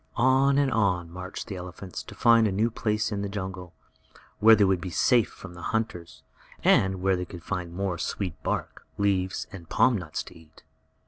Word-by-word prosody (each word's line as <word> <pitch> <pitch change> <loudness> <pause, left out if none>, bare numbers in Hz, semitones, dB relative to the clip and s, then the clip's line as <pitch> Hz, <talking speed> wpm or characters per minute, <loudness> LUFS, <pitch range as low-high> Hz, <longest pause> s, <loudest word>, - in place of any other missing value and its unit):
On 135 +3 +4
and 140 -2 +2
on 90 -7 +1
marched 90 +2 -7
the 100 - -6
elephants 90 0 -7
to - - -12
find 115 -1 +5
a - - -1
new 110 +5 +1
place 105 0 -1
in 100 -1 -2
the 100 - -3
jungle, 95 -3 -6 0.6
where 110 +1 +8
they 105 - +3
would 95 -2 +2
be 95 - -4
safe 120 +6 +3
from 95 -2 -11
the 85 - -11
hunters, 90 -6 -3 0.4
and 95 -1 +3
where 95 0 +3
they 90 - -3
could 85 -1 -10
find 90 -4 -4
more 90 -1 -3
sweet 90 0 -4
bark, - - -4
leaves 95 -2 0
and 85 -4 -11
palm 125 -1 +4
nuts 80 -7 -4
to - - -14
eat. 80 -1 -18
95 Hz, 195 wpm, -27 LUFS, 90-110 Hz, 0.6 s, where